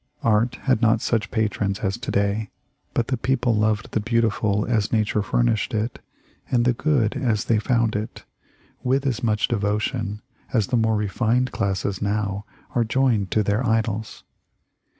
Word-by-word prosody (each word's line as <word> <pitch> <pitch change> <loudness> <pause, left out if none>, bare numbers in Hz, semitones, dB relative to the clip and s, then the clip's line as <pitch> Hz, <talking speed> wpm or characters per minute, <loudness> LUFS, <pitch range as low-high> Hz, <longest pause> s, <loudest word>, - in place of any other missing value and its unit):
Art 115 +2 +2
had 130 -4 +2
not 115 -1 +4
such 110 -1 0
patrons 105 -2 -1
as 100 -3 0
to 120 - -5
day, 100 +1 0 0.5
but 120 +1 0
the 130 - 0
people 125 0 +1
loved 105 -1 0
the - - +1
beau 115 +2 +1
tiful 105 -2 +1
as 110 -4 +1
Nature 105 -1 +1
furnished 115 +1 0
it, 110 +2 -2 0.5
and 120 -1 +2
the 125 - +4
good 125 -4 +1
as 115 -3 0
they 115 -3 +2
found 115 -2 +1
it, 105 +1 -5 0.6
with 135 +2 +1
as 130 -2 0
much 110 -3 +1
devotion 105 0 -1 0.3
as 110 -5 +2
the 130 - +1
more 110 -1 +2
refined 115 +4 +1
classes 100 -2 -2
now 100 0 -1 0.3
are 120 -4 +2
joined 115 -4 +1
to 110 - +2
their 105 +5 0
idols. 110 -2 -1
110 Hz, 165 wpm, -23 LUFS, 105-120 Hz, 0.6 s, not